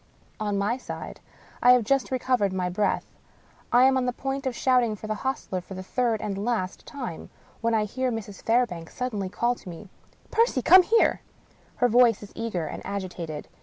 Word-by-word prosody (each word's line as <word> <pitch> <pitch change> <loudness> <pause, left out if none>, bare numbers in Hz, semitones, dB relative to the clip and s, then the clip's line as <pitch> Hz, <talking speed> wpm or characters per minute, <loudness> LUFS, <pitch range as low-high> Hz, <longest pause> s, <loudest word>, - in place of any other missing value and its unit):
On 205 -2 -1
my 205 +5 0
side, 260 - -8 0.4
I 250 +1 +8
have 250 -2 +4
just 275 +4 +1
recovered 250 -6 +1
my 185 -1 -1
breath, 205 +3 0 0.7
I 245 +1 +6
am 265 0 +5
on 255 -1 0
the - - +2
point 270 +2 -3
of 255 - -2
shout 255 0 +3
ing 225 -3 -1
for 210 - -10
the 215 - -1
hostler 250 -8 -2
for 190 - -10
the 185 - -6
third 230 +1 0
and 200 -1 -3
last 215 -6 -2
time, 250 - -6 0.3
when 230 0 +1
I 215 - +2
hear 255 +4 -2
Mrs. 210 -3 -6
Fairbank 225 -9 0
suddenly 210 -7 -3
call 235 +5 +1
to 215 - -11
me: 180 +4 -10 0.2
" - - -32
Percy! 450 - +2
come 370 +2 +9
here 450 +5 +3
I - - -33
" - - -32
Her 245 - +6
voice 235 -2 +4
is 205 - -12
eager 220 -8 -3
and - - -6
agitated. 180 -6 -5
230 Hz, 205 wpm, -26 LUFS, 195-250 Hz, 0.7 s, come